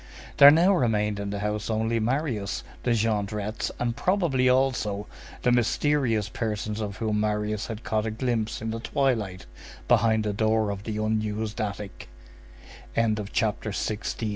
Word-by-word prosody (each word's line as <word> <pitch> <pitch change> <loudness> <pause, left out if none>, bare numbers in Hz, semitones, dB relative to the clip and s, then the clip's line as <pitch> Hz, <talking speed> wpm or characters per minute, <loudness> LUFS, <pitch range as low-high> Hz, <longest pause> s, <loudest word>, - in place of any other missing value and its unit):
There 140 - +11
now 170 +6 +5
remained 105 - +1
in 100 0 -3
the 100 0 -4
house 105 +1 -2
only 110 +1 0
Marius, 115 -4 -1 0.2
the 120 -1 +1
Jondrettes 105 -1 -1
and 120 -1 -1
probably, 165 -10 +2
also, 125 -6 +1 0.4
the 125 - +3
mysterious 120 -2 +1
persons 105 0 -3
of 105 -1 -4
whom 110 -2 0
Marius 105 0 -1
had 115 -1 -6
caught 110 0 -1
a - - 0
glimpse 110 -1 -2
in 110 - -2
the 115 - -4
twilight, 115 -6 -1 0.4
behind 110 -2 +3
the 105 -1 -1
door 110 0 +1
of 100 +1 -6
the 110 -1 -3
unused 110 0 -1
attic. 105 -1 -5
110 Hz, 140 wpm, -26 LUFS, 105-120 Hz, 0.4 s, There